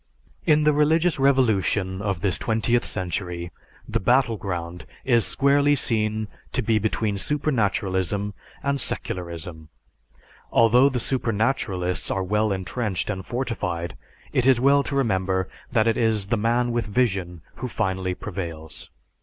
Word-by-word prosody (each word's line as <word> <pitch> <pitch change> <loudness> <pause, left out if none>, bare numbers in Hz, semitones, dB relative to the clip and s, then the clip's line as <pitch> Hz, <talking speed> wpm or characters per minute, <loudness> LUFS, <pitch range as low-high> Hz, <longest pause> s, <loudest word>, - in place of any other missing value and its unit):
In 150 0 +5
the 150 0 +4
religious 155 +2 +2
revolution 105 -8 +2
of 100 -4 -2
this 100 -3 0
twentieth 115 +2 +1
century, 90 -2 -4 0.4
the - - 0
battle 120 +2 +3
ground 90 -4 -5 0.2
is 120 -4 +4
squarely 140 +1 +3
seen 110 -4 -1 0.3
to - - +1
be 110 -2 +2
between 105 -1 -1
supernaturalism 105 - 0 0.3
and 140 -1 0
secularism. 85 -8 -4 0.8
Although 120 +4 +5
the 130 -2 -2
supernaturalists 110 -7 -1
are 95 - 0
well 105 +3 +1
entrenched 95 +1 -2
and 95 -2 -5
fortified, 90 -9 -3 0.4
it 125 0 +2
is 130 -3 +5
well 140 +2 +5
to 140 - -4
remember 95 -7 +1 0.2
that 110 - +3
it 115 - +2
is 110 -3 +2
the 110 - 0
man 120 +2 +1
with 120 -1 -1
vision 95 -7 0 0.2
who 130 - -4
finally 95 -5 -1
prevails. 85 -6 -6
110 Hz, 135 wpm, -24 LUFS, 95-125 Hz, 0.8 s, In